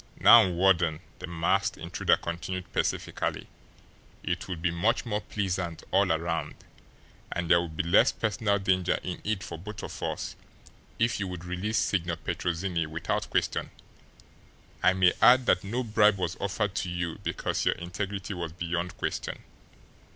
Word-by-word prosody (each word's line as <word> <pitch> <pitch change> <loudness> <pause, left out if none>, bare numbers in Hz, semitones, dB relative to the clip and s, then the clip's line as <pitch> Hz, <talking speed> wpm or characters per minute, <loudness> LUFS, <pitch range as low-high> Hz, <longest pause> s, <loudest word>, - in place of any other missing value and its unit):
"Now, 115 -5 +8
Warden," 85 -3 +2 0.2
the - - -6
masked 95 +4 0
intruder 85 +2 +1
continued 90 +1 -5
pacifically, - - -1 0.8
"it - - -2
would 90 -3 -4
be 85 +1 0
much 85 +10 +1
more 105 -2 -1
pleasant 90 -6 -3
all - - +3
around - - -1 0.8
and 85 0 -2
there 85 - +6
would 80 -2 -7
be - - +1
less 85 +1 +5
personal 105 -2 0
danger 95 -2 +1
in 90 - -5
it 105 -3 -1
for 85 - -7
both 105 +3 -8
of - - -7
us - - -3 0.6
if 115 -1 +1
you 100 - -2
would 90 -2 -7
release 90 +5 -2
Signor 85 -3 0
Petrozinni 85 -1 -2
without 80 +2 -2
question. - - 0 1.1
I 90 +1 +5
may 90 -1 +4
add 125 +1 +7
that 90 - +3
no 120 +6 -2
bribe 105 -2 +4
was 90 -2 -2
offered 100 0 -1
to 90 - -1
you 85 -2 -3
because - - -2
your - - +2
integrity 95 +3 -4
was 85 -3 -5
beyond 85 0 -3
question." - - -4
90 Hz, 155 wpm, -28 LUFS, 85-100 Hz, 1.1 s, Now